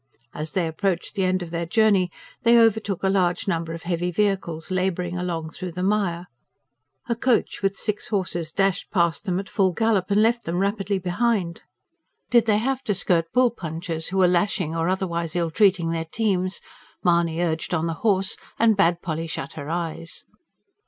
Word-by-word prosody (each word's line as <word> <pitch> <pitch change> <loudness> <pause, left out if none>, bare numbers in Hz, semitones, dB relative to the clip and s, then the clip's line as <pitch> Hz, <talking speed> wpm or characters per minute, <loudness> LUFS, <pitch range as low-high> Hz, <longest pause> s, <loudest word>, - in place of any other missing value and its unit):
As 155 0 -5
they 180 -3 +1
approached 175 +2 -2
the 195 -3 0
end 185 0 +1
of 165 - -9
their 170 0 -2
journey, 200 -2 +3 0.3
they 235 -1 +5
overtook 220 -4 +2
a - - +3
large 185 -2 +1
number 165 -3 -1
of 165 0 -7
heavy 175 0 -1
vehicles 185 -3 -1
labouring 180 -1 -1
along 170 -3 -3
through 180 0 -6
the 180 +2 -3
mire. 190 -4 0 0.8
A 235 - 0
coach 240 0 +1
with 195 0 +1
six 210 -1 -2
horses 180 -6 -2
dashed 195 +2 0
past 170 -3 +1
them 185 -2 0
at 195 - -6
full 190 -3 +1
gallop, 210 -2 +1
and 200 +1 +3
left 235 +1 +1
them 170 +1 -2
rapidly 200 0 0
behind. 185 -1 -1 0.7
Did 235 -2 +5
they 210 -1 +4
have 260 +4 -1
to 205 -5 0
skirt 165 -3 +1
bull 250 -1 +4
punchers 165 -4 -4
who 190 - -2
were 185 -1 +5
lashing 180 -2 +1
or 165 +1 0
otherwise 170 -3 -2
ill 170 -2 0
treating 185 -3 +3
their 165 -1 -2
teams, 185 0 -1 0.4
Mahony 170 -2 +2
urged 165 -2 -1
on 165 -2 0
the 165 - -1
horse 195 -3 +2 0.2
and 225 -1 +4
bade 175 -3 +2
Polly 165 -1 -3
shut 140 -3 -5
her 145 -1 -7
eyes. 165 0 -4
180 Hz, 185 wpm, -24 LUFS, 170-200 Hz, 0.8 s, they